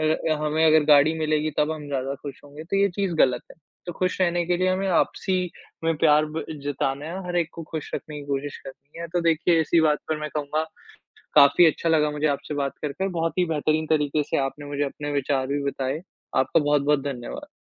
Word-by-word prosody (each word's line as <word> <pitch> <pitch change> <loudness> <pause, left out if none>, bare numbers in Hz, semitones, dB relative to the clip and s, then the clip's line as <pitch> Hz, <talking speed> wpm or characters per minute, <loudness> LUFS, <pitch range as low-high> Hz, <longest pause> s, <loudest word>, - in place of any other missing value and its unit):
अ, - - 0 0.4
हमें 155 +1 +1
अगर 155 -1 +5
गाड़ी 145 +1 +6
मिलेगी 155 0 0
तब 150 +1 +2
हम 155 -2 -7
ज़्यादा 135 -1 -2
खुश 140 -2 -8
होंगे 145 +2 -10
तो 185 - -2
ये 200 0 +4
चीज़ 190 0 -2
गलत 125 -5 +3
है। - - -20 0.3
तो 175 - -4
खुश 185 +1 -1
रहने 175 -1 +2
के 175 0 +1
लिए 185 +1 +1
हमें 190 +1 0
आपसी 185 +1 +1 0.4
में 165 0 +2
प्यार 150 -1 +5
ब 155 +1 -5 0.2
जताना 140 0 -2
है, 180 +3 -6
हर 175 0 -2
एक 170 -2 0
को 165 - -7
खुश 155 -2 -5
रखने 150 - -6
की 140 - -11
कोशिश 140 0 -3
करनी 140 +4 -12
है। 170 - -5
तो 175 - +2
देखिए 165 +1 +3
इसी 165 +1 +3
बात 150 -2 +3
पर 155 - 0
मैं 150 0 -4
कहूँगा 150 +1 -1 0.7
काफ़ी 145 +4 +7
अच्छा 165 +1 0
लगा 150 -2 +3
मुझे 150 +1 0
आपसे 145 +1 -2
बात 140 -1 -1
करके। 155 +6 -2
बहुत 165 -2 -2
ही 180 - +3
बेहतरीन 155 -1 0
तरीके 150 -1 +1
से - - -2
आपने 145 +2 -6
मुझे 145 0 -2
अपने 145 +1 -4
विचार 140 -2 0
भी 140 +1 -2
बताए। 140 +1 -2 0.3
आपका 130 +4 +3
बहुत-बहुत 145 -1 +2
धन्यवाद। 140 - -6
150 Hz, 220 wpm, -24 LUFS, 145-165 Hz, 0.7 s, काफ़ी